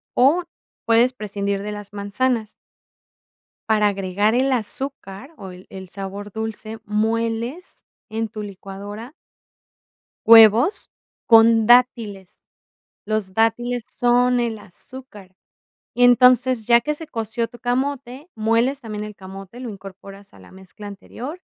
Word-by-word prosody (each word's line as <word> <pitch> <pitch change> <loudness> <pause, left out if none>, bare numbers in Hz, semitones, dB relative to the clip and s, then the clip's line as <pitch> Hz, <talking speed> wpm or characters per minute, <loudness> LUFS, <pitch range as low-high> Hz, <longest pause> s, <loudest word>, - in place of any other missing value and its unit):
o 285 +8 +4 0.4
puedes 235 +3 +4
prescindir 200 -3 -3
de 210 - -5
las 205 -1 -9
manzanas. 215 +3 -1 1.2
Para 210 -1 +3
agregar 200 +2 0
el 260 +3 +2
azúcar 245 -2 -2
o 190 -2 -9
el 180 +1 -14
el 190 -1 -10
sabor 200 +2 -7
dulce, 220 +1 -6
mueles 230 - -2 0.2
en 225 +1 -2
tu 215 0 -8
licuadora 205 +4 -9 1.1
huevos 225 - +6 0.3
con 225 -1 +6
dátiles, 230 -6 +2 0.7
los 210 -3 -2
dátiles 235 +3 0
son 245 +1 +2
el 230 -2 -2
azúcar, 205 -1 -12 0.6
y 245 - +3
entonces, 250 -1 +4
ya 235 0 +5
que 300 +5 -2
se 320 +2 -9
coció 230 -3 -3
tu 240 - -15
camote, 260 +3 -3
mueles 230 +5 +1
también 215 -4 -6
el 210 0 -8
camote, 195 +4 -11
lo 255 - -6
incorporas 195 0 -12
a - - -16
la - - -16
mezcla 190 +2 -13
anterior 250 - -9
225 Hz, 125 wpm, -21 LUFS, 205-245 Hz, 1.2 s, huevos